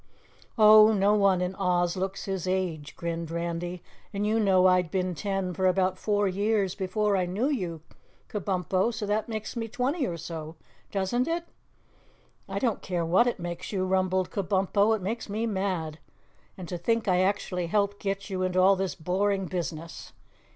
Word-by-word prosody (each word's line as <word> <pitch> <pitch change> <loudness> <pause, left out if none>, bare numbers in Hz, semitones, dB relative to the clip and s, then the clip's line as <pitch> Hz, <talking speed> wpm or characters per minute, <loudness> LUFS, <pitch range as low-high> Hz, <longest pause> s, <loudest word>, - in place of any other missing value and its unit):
"Oh, 215 0 +8
no 200 0 +3
one 195 -3 +3
in 180 +1 -1
Oz 180 -2 +1
looks 190 +1 -3
his 190 -2 -3
age," 180 -6 -2
grinned 170 -1 -4
Randy, 170 +1 -4 0.3
"and 200 +1 -2
you 220 +2 +2
know 190 -3 +4
I'd 180 -2 +4
been 185 0 -1
ten 195 0 -2
for 185 +1 +1
about 185 0 +1
four 205 -1 +1
years 200 0 +1
before 200 +2 0
I 185 -2 +1
knew 195 +8 -1
you, 180 - -3 0.5
Kabumpo, 190 +1 0
so 215 -2 -4
that 210 +2 -1
makes 220 +1 -5
me 225 -1 -3
twenty 260 +6 -1
or 170 -2 -4
so, 160 -1 -7 0.4
doesn't 205 +6 0
it?" 335 +1 -1 1.0
"I - - -3
don't 240 -5 0
care 175 -3 -2
what 185 +9 +4
it 240 - -1
makes 175 0 -5
you," 190 -3 0
rumbled 185 -1 +1
Kabumpo, 200 +2 +2
"it 205 - -6
makes 220 +3 -3
me 215 +3 -1
mad. 185 -7 -2 0.6
And 185 -2 -7
to 175 0 -5
think 225 +5 0
I 180 -1 +3
actually 185 -2 -1
helped 200 +2 0
get 195 0 -3
you 190 -2 -3
into 185 0 +1
all 190 +2 +6
this 190 -1 -2
boring 190 +3 0
business. 170 -2 -5
190 Hz, 175 wpm, -27 LUFS, 180-205 Hz, 1.0 s, Oh